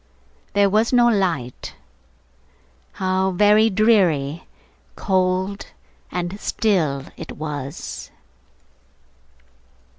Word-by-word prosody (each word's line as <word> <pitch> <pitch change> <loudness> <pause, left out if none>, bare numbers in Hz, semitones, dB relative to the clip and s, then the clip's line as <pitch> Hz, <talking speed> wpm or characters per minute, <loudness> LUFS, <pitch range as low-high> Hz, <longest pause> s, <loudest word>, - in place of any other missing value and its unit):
There 200 0 +4
was 215 +4 +2
no 240 -1 +5
light. 170 - -2 1.2
How 190 0 0
very 210 +4 +4
dreary, 180 -9 +2 0.5
cold, 190 0 -1 0.4
and 180 +3 -4
still 165 - 0
it - - -8
was! 145 -1 -6
190 Hz, 70 wpm, -21 LUFS, 160-210 Hz, 1.2 s, no